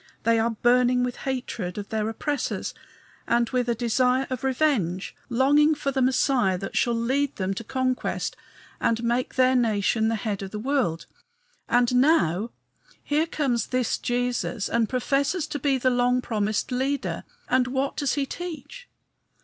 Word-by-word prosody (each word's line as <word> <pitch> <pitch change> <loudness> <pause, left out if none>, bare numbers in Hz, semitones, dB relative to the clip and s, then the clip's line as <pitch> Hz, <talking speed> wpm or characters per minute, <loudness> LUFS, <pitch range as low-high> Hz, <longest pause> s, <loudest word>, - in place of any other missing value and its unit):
They 230 0 +3
are 225 +1 +2
burning 245 +2 +3
with 250 -1 -2
hatred 235 -8 -4
of 205 -1 -6
their 220 0 -1
oppressors 290 +5 -3 0.5
and 235 0 +2
with 250 -2 0
a 235 - +2
desire 250 +3 +2
of 255 -1 -3
revenge, 250 - 0
longing 290 +5 +4
for 280 -1 -2
the 265 -1 0
Messiah 250 -6 +2
that 195 - -6
shall 240 -1 +2
lead 265 +5 0
them 190 0 -1
to 215 - -6
conquest 255 +2 -2 0.4
and 230 0 0
make 240 +2 -1
their 255 0 +4
nation 220 -2 +2
the 225 - +1
head 210 -2 -3
of 195 - -5
the 210 - -6
world. 215 - -1 0.6
And 245 0 +3
now, 230 - +3 0.5
here 305 +3 +1
comes 255 -8 -1
this 255 -2 0
Jesus 245 -3 -1
and 230 -2 +1
professes 280 +6 0
to 300 -2 -5
be 275 -1 +1
the 255 0 +2
long 245 0 +2
promised 215 -1 -1
leader; 270 +3 -1 0.2
and 255 0 +2
what 270 +2 -1
does 285 -3 0
he 285 -1 0
teach? 355 - -8
250 Hz, 160 wpm, -25 LUFS, 225-270 Hz, 0.6 s, longing